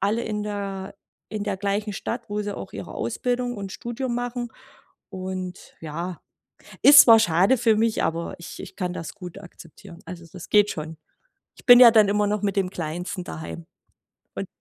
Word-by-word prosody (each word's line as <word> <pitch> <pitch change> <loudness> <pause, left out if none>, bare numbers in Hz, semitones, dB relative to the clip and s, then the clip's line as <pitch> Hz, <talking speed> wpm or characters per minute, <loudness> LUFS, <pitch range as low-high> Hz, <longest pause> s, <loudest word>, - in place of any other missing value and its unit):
alle 215 +4 0
in 210 -1 -3
der 200 -2 -5 0.3
in 215 -1 -4
der 205 -2 -2
gleichen 205 +2 -2
Stadt, 230 +3 -5
wo 210 0 -1
sie 205 -1 -5
auch - - -8
ihre - - -8
Ausbildung 245 -1 -2
und 195 -2 -6
Studium 240 +3 -4
machen. 245 -1 -4 0.6
Und, 185 -1 -7
ja, 170 +3 -6 0.6
ist 285 0 +11
zwar 230 -2 +8
schade 195 +4 +3
für 225 -2 +3
mich, 225 0 +1
aber 165 +1 -2
ich 170 - -10
ich - - -11
kann 180 -3 -3
das 165 - -7
gut 180 0 -9
akzeptieren. 175 -1 -14
Also, 175 -2 -9
das 180 -1 -10
geht 210 0 +5
schon. 160 0 -6 0.6
Ich - - -17
bin 245 -1 +10
ja 240 -2 +10
dann 215 -3 +5
immer 205 +1 +2
noch 210 0 -1
mit 200 -1 -1
dem 195 -2 +1
Kleinsten 175 +2 -5
daheim. 80 - -8 0.7
Und - - -3
200 Hz, 180 wpm, -24 LUFS, 180-225 Hz, 0.7 s, ist